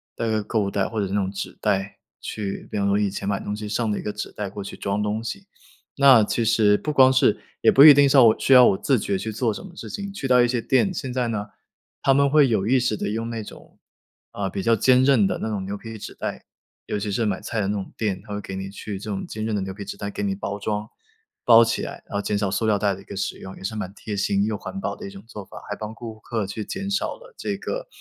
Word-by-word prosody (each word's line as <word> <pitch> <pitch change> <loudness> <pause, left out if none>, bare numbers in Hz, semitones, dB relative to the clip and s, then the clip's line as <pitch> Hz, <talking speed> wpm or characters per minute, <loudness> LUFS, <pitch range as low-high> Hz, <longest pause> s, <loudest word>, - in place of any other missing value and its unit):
带 115 - -2
个 110 -1 0
购 110 +2 -1
物 100 -1 -2
袋， 100 -1 0
或 110 - -3
者 100 - 0
是 95 - -5
那 105 - +2
种 95 -1 -1
纸 100 - -6
袋 100 -1 -1 0.2
去 100 -2 -5
比 - - -3
方 100 - +1
说 100 0 +2
以 105 -1 +1
前 100 0 -4
买 100 - 0
东 105 - -4
西 105 0 -6
剩 110 0 0
的 105 - -1
一 - - -5
个 105 - -3
纸 105 0 -6
袋 105 -2 -4
过 100 +1 -7
去 100 - -8
装 100 +1 -2
东 105 +2 -2
西。 195 +11 -6 0.5
那 135 -5 +7
其 115 +3 0
实 110 -2 +4
不 150 - -3
光 130 -3 +6
是 130 - +3 0.2
也 - - +6
不 135 - +7
一 150 - +12
定 140 0 +5
是 140 - +4
要 130 - +9
我 110 -1 +6
需 - - -1
要 125 -1 +9
我 95 - +3
自 135 +4 +2
觉 100 -1 -1
去 110 - -4
做 110 +1 0
什 - - -8
么 195 - -11
事 - - -8
情， 200 -2 -5
去 195 -9 -4
到 125 -1 +5
一 120 - +4
些 120 0 0
店， 140 - +2
现 135 -8 -4
在 125 -1 0
呢 105 -2 -3 0.5
他 135 - +3
们 140 +1 +4
会 145 0 +5
有 110 -5 +1
意 130 +4 +3
识 120 -3 0
地 - - -2
用 115 +2 -3
那 115 -2 -4
种， - - -14 0.5
啊， 100 -1 -3
比 95 +1 -4
较 115 +2 +4
坚 130 +4 +4
韧 130 -7 +4
的 - - -2
那 - - -3
种 100 -3 -3
牛 100 +2 -4
皮 115 +1 -9
纸 - - -8
袋， - - -5 0.4
尤 - - -2
其 105 0 -3
是 115 +3 0
买 100 -2 -1
菜 115 - -3
的 95 - -1
那 100 - 0
种 100 -2 -6
店， 100 -4 -1
他 105 - -7
会 100 - -3
给 95 - -7
你 95 0 -5
去 100 0 -6
这 105 +2 -6
种 95 - -4
坚 110 0 -5
韧 110 - -2
的 100 - -1
牛 95 0 -4
皮 100 +1 -8
纸 100 - -6
袋 100 - -4
给 100 - -5
你 100 -1 0
包 100 +1 -4
装， 105 +1 -3 0.6
包 115 -1 +8
起 115 - -1
来， - - -7
然 - - -3
后 - - 0
减 105 - -1
少 100 -1 0
塑 105 +4 -1
料 105 -2 +2
袋 100 -1 +1
的 95 - -12
一 - - -15
个 100 - -9
使 100 - -3
用， 95 - -9
也 - - -12
是 105 +3 -3
蛮 100 -3 -5
贴 105 0 -6
心 100 0 +1
又 110 -1 -2
环 195 - -7
保 - - -3
的 210 - -9
一 195 - -7
种 195 - -12
做 105 -4 -9
法。 - - -11
还 105 - -2
帮 110 +1 -6
顾 115 -1 -9
客 110 -2 -3
去 105 +2 -5
减 195 +1 -4
少 195 -1 -1
了 - - -16
这 - - -3
个 - - -5
110 Hz, 325 characters per minute, -23 LUFS, 100-125 Hz, 0.6 s, 一